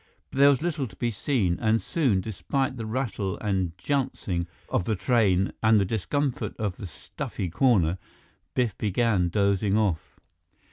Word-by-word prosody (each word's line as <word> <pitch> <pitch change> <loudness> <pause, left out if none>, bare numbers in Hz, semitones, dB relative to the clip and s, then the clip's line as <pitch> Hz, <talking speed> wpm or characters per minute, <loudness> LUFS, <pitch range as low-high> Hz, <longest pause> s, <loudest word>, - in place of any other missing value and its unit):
But 135 - -4
there 140 +1 +8
was 140 +1 +2
little 150 -6 -1
to - - -15
be 120 -1 -1
seen, 105 -6 0
and 110 0 +2
soon, 125 - +1
despite 130 +6 -2
the 115 -3 -5
rattle 110 -5 -2
and 95 -5 -1
jouncing 95 -9 -1 0.2
of 90 - 0
the 110 - 0
train 100 -2 +2
and 110 -1 +5
the 100 - +2
discomfort 125 +7 -1
of 105 -4 -2
the 100 - -6
stuffy 85 +3 -6
corner, 95 - +3 0.6
Biff 120 -6 +1
began 105 -3 +1
dozing 100 +1 +2
off. 95 -7 -1
110 Hz, 155 wpm, -26 LUFS, 95-125 Hz, 0.6 s, there